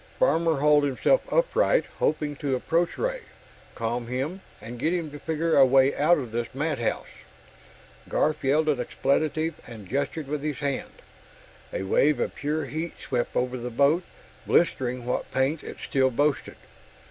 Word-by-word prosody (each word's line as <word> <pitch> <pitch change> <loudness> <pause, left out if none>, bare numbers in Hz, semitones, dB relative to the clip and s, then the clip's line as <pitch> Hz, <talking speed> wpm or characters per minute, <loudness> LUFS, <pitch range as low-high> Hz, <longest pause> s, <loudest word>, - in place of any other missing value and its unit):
Farmer 165 - +3
hauled 150 +1 +4
himself 145 - +1
upright, - - +2
hoping 150 -1 0
to 140 -2 -1
approach 165 +6 0
Ray, - - -2 0.5
calm 115 +1 -2
him, 135 +10 -3 0.2
and 120 +1 -9
get 160 +6 +1
him 165 -4 -3
to 145 - -9
figure 160 +2 0
a 140 - +8
way 135 +1 +4
out 160 +5 +4
of 125 -6 -5
this 120 +2 -4
madhouse. 145 -5 -1 1.0
Garf 155 0 +1
yelled 150 +4 +2
an 145 -4 +2
expletive 155 +5 -1
and 110 -5 -10
gestured 140 - -2
with 150 0 -3
his 150 -2 -3
hand. 140 -1 -4 0.7
A - - -3
wave 135 +8 +3
of - - -1
pure 150 +2 -2
heat 160 +3 -4
swept 125 -2 -2
over 125 +1 0
the 120 +1 -4
boat, 140 +8 +3 0.5
blistering 125 -7 +1
what 125 - -2
paint 135 +4 0
it - - -8
still 130 -1 +3
boasted. 145 +3 0
145 Hz, 160 wpm, -26 LUFS, 130-160 Hz, 1.0 s, a